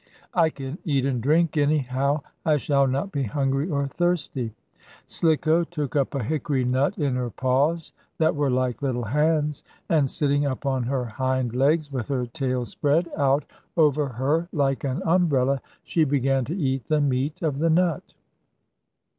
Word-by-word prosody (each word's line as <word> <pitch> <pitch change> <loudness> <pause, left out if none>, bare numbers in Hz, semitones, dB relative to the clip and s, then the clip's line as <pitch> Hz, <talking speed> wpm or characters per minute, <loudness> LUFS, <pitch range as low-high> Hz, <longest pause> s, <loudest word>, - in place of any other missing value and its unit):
I 165 -3 +4
can 140 +1 -7
eat 140 -4 +1
and 130 -3 -1
drink, 155 +5 +2
anyhow. 145 -1 +1 0.2
I 155 -2 +3
shall 140 -1 +2
not 140 +9 -1
be 140 - -2
hungry 135 - 0
or 140 -3 0
thirsty." 145 -7 -1 0.5
Slicko 160 +1 +2
took 150 -6 -4
up 140 0 +1
a 135 - -1
hickory 140 -1 -1
nut 130 +3 +1
in 140 -3 0
her 125 -1 -2
paws, 140 +8 0 0.2
that 160 -1 +2
were 145 -1 +1
like 125 -2 0
little 125 -3 -1
hands, 150 +4 +1 0.3
and, 150 -5 +3
sitting 145 0 +1
up 140 0 -3
on 135 -2 +1
her 125 +1 -1
hind 130 +1 -1
legs, 145 +4 +2
with 130 -5 -3
her 130 -3 -1
tail 125 +1 -2
spread 155 +7 0
out 140 0 +2 0.3
over 150 -2 +3
her 140 +7 0
like 140 -4 0
an 140 +5 -2
umbrella, 140 -7 +2 0.2
she 165 - +1
began 135 -2 +1
to 165 +9 -4
eat 135 - -1
the 155 -1 +1
meat 145 +4 -1
of 145 -4 -1
the 165 +2 +2
nut. 170 -1 +1
140 Hz, 165 wpm, -24 LUFS, 130-155 Hz, 0.5 s, I